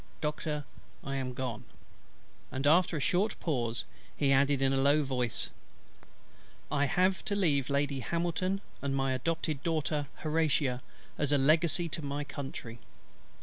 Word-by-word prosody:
Doctor, 150 -1 -2 0.4
I 135 0 -3
am 130 -1 -3
gone;" 130 -3 -3 0.9
and 135 +2 -3
after 165 +2 +4
a - - -1
short 185 +9 +1
pause 120 -8 -1 0.3
he 140 -2 +3
added 140 +1 +4
in 135 0 +3
a 135 - +2
low 145 +2 +4
voice, 125 -4 -1 1.2
"I 145 -1 +3
have 185 +5 +2
to 205 - 0
leave 145 -9 +2
Lady 140 -1 +1
HAMILTON, 175 - -1 0.2
and 140 -1 -1
my 135 -1 +1
adopted 150 +2 -1
daughter 155 -3 0 0.2
HORATIA, 150 -5 +1 0.4
as 145 -1 +1
a 145 - +5
legacy 160 +4 +4
to 160 - -4
my 145 0 -3
Country." 135 -5 -7
145 Hz, 145 wpm, -31 LUFS, 135-160 Hz, 1.2 s, a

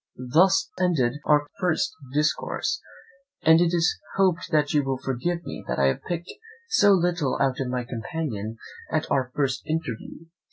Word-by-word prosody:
Thus 190 +3 +4
ended 145 -8 +1
our 150 -1 +4
first 175 -4 +1 0.2
discourse; 150 +2 0 0.6
and 160 +1 +6
it 170 -1 +3
is 175 -1 +1 0.2
hoped 185 -3 +2
that 150 -2 +2
you 145 -1 +3
will 135 -1 -1
forgive 150 +7 -2
me - - -7
that - - -2
I 70 -1 +4
have 65 - -2
picked 175 0 -4 0.4
so 205 - +5
little 175 -7 +1
out 135 -2 +1
of 135 - -1
my 125 0 -2
companion 115 -2 -4 0.3
at 155 0 +1
our 130 -2 +1
first 135 -3 0
interview. 155 -1 -4
150 Hz, 160 wpm, -25 LUFS, 130-175 Hz, 0.6 s, and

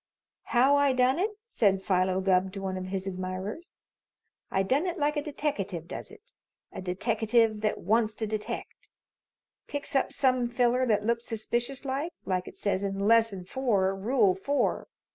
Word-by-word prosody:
"How 265 +4 +4
I 285 -2 +3
done 255 +4 +3
it?" 400 +4 +2 0.2
said 195 - +1
Philo 185 0 +1
Gubb 190 0 +2
to 195 - -6
one 190 -1 -2
of 185 0 -4
his 190 0 -3
admirers. 190 - -5 0.7
"I 190 - +1
done 275 - +1
it 355 +1 -3
like 295 -1 +1
a 295 - 0
deteckative 245 - -3
does - - -6
it 440 +3 -17 0.4
a - - -7
deteckative 220 +3 +1
that 215 -1 0
wants 215 +3 +2
to 220 - -2
detect 215 0 -5 0.8
picks 285 0 -5
up 270 - +2
some 255 -3 +2
feller 245 +1 +2
that 210 -2 +2
looks 235 +1 0
suspicious 240 +5 -2
like, 280 +6 -2
like 185 -1 -1
it - - -10
says 200 -1 0
in 195 -1 -2
Lesson 215 -3 +3
Four, 195 -5 +1
Rule 210 0 +3
Four. 275 +10 -1
225 Hz, 165 wpm, -28 LUFS, 190-265 Hz, 0.8 s, How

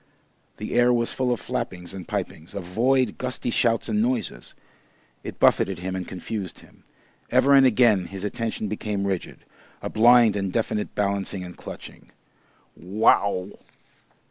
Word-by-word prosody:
The - - -5
air 120 0 +4
was 120 -1 0
full 130 -1 0
of 120 - 0
flappings 95 -8 -5
and 95 -3 -8
pipings, 80 +6 -5
of 100 - -4
void, 120 +6 +1
gusty 125 -1 -2
shouts 115 0 +1
and 210 - +1
noises; 240 -1 -2 0.7
it - - -7
buffeted 95 -2 +3
him 95 +2 -4
and 95 -2 -4
confused 95 0 -6
him; - - -21 0.5
ever 140 - +4
and 135 -1 +7
again 110 -6 +4
his 95 -1 -7
attention 110 +1 -3
became 105 -1 -3
rigid 95 -3 -4 0.3
a - - -5
blind 115 -1 +6
and 100 -2 -2
deaf 115 +3 -1 0.2
balancing 100 -2 -1
and 90 -1 -9
clutching. - - -11 0.7
"Wow!" 100 0 +2
105 Hz, 145 wpm, -24 LUFS, 95-120 Hz, 0.7 s, and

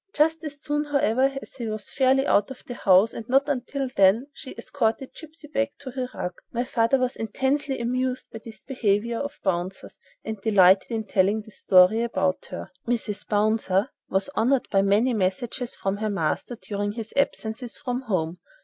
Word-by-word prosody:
Just 320 +1 +2
as 295 -2 -6
soon, 295 0 -1
however, 270 -1 +2
as - - -13
he 235 -3 -4
was 215 -1 -4
fairly 270 0 +3
out 205 -3 +3
of 265 - -10
the 245 - -6
house, 195 -1 +4
and 230 +1 -8
not 270 +3 +4
until 275 0 -2
then, 215 0 +4
she 265 - -9
escorted 255 -1 -1
"Gipsy" 320 -1 -12
back 280 -1 -1
to 270 -2 -8
her 255 -1 -3
rug. 180 - -3 0.2
My 240 +1 -1
father 235 +1 +2
was 255 -1 -1
intensely 265 +5 -1
amused 255 +2 -2
by 225 - -7
this 225 -1 -10
behaviour 230 -3 0
of 285 +1 -5
"Bouncer's" 185 0 -3 0.3
and 220 -2 -5
delighted 190 -3 +5
in 225 -2 -2
telling 205 +1 +1
this 220 -1 -12
story 185 +4 +5
about 190 -5 0
her. - - -7 0.2
"Mrs. 225 -4 -2
Bouncer" 210 0 +1 0.2
was 190 +5 0
honored 255 +3 +2
by 195 - +4
many 210 +6 +3
messages 220 +5 -2
from 195 +1 -2
her 215 +1 -1
master 195 +5 -1
during 205 0 -3
his 225 -1 -7
absences 240 -3 -1
from 250 0 -3
home. 180 -8 -2
230 Hz, 180 wpm, -25 LUFS, 205-265 Hz, 0.3 s, delighted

